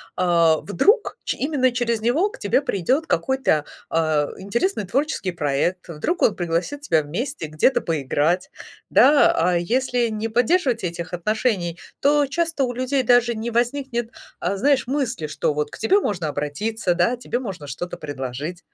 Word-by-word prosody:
а, 170 -3 +3
вдруг 415 - +1
ч - - -1
именно 265 -3 +1
через 235 -2 0
него 260 - +1
к - - -13
тебе 205 +6 +2
придёт 260 - 0
какой-то, 265 - +1 0.3
э, - - -3 0.4
интересный 215 - -1
творческий 255 - -1
проект, 165 +4 -1
вдруг 170 - -2
он 215 - +4
пригласит 175 +11 -2
тебя 160 - +2
вместе 180 - -4
где-то 155 - +2
поиграть, 160 +3 0 0.4
да, 285 +2 +6
а 175 +1 +2
если 245 +6 0
не 220 0 -3
поддерживать 245 - +1
этих 170 -1 -5
отношений, 180 -2 -1 0.2
то 290 +1 +3
часто 325 0 -1
у 250 - 0
людей 255 +2 0
даже 245 0 +4
не 225 +2 -4
возникнет, 240 0 -1 0.3
э, 180 +3 0
знаешь, 265 +4 +2
мысли, 255 - -2
что 150 - -1
вот 150 0 -2
к - - -10
тебе 385 - +3
можно 180 - -2
обратиться, 175 +8 -2
да, 180 +8 +2
тебе 240 0 -3
можно 190 - -6
что-то 165 +6 -5
предложить. 145 +4 -5
220 Hz, 155 wpm, -22 LUFS, 170-260 Hz, 0.4 s, да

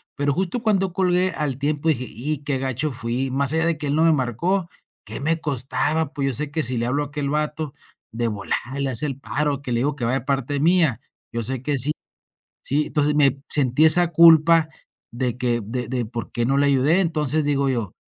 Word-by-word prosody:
pero 145 0 0
justo 190 - -2
cuando 195 -5 +1
colgué 185 0 +2
al 145 -5 -3
tiempo 150 +2 -1
dije: 130 -5 0
"Y 140 +7 -4
qué 140 -3 -2
gacho 135 +3 -2
fui", 120 +3 -3
más 140 +2 +1
allá 160 0 +2
de 165 - 0
que 150 -1 -4
él 140 - 0
no 160 - +3
me 165 - +5
marcó. 165 - -1 0.4
¿Qué - - -4
me 165 +3 0
costaba? 145 +2 0
Pues, 140 -2 -2
yo - - -3
sé 145 +3 -1
que 155 +2 -1
si 125 -1 +1
le 115 - -1
hablo 140 +3 0
a - - -8
aquel 145 -1 -4
bato 150 0 -2 0.4
de 115 +1 -1
volada 115 +6 -3
le 140 -1 -1
hace 130 +3 +1
el 135 -1 -6
paro, 145 0 -2
que 130 - -6
le 115 - 0
digo 145 +1 0
que 120 -5 -4
va 120 - 0
de 135 - 0
parte 135 +1 -2
mía, 160 - +2 0.3
yo 115 - -2
sé 130 +1 -2
que 145 0 -1
sí, 150 +5 +3 0.7
sí. 150 +2 -1
Entonces, 150 0 0
me 140 -2 +2
sentí 140 +1 +2
esa 175 +2 +6
culpa 165 0 +6 0.5
de 125 0 -2
que 120 -2 -1
de 125 +3 -4
de 125 -1 -1
por 115 +1 -7
qué 120 - -1
no 135 +3 +1
le 145 0 +3
ayudé. 140 +6 +3
Entonces, 155 -3 0
digo 140 -1 +1
yo, 115 -7 -3
145 Hz, 225 wpm, -22 LUFS, 130-155 Hz, 0.7 s, esa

